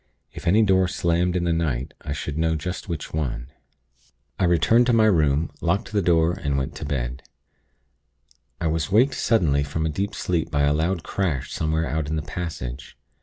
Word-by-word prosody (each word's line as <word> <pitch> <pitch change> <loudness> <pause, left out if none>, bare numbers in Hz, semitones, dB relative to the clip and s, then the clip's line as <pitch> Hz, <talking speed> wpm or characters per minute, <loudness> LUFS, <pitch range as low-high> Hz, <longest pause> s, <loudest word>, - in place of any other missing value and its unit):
If - - -8
any 105 +6 +5
door 95 -2 +3
slammed 90 0 0
in 90 - +1
the 85 -1 +1
night, 70 -7 -1
I 75 - -6
should 75 0 -4
know 80 0 +1
just 90 +4 -5
which 85 -4 -5
one. 65 -4 -3 0.9
"I - - +3
returned 90 +8 +4
to 120 - +3
my 110 -1 +5
room, 80 -6 +2
locked 100 +8 0
the 105 -1 +1
door, 85 -1 +3
and 70 -7 -2
went 65 -1 -2
to - - -5
bed. 65 -1 -3 1.4
I 85 - -3
was 80 +2 -1
waked 125 +7 +4
suddenly 80 -11 +2
from 80 +3 -2
a - - +1
deep 100 +7 -3
sleep 85 -3 -1
by 75 -3 +1
a 70 0 +3
loud 80 +3 0
crash 85 -10 -2
somewhere 80 +1 0
out 80 -1 -2
in 80 - -1
the 80 - -2
passage. 70 -7 -6
80 Hz, 190 wpm, -24 LUFS, 75-90 Hz, 1.4 s, any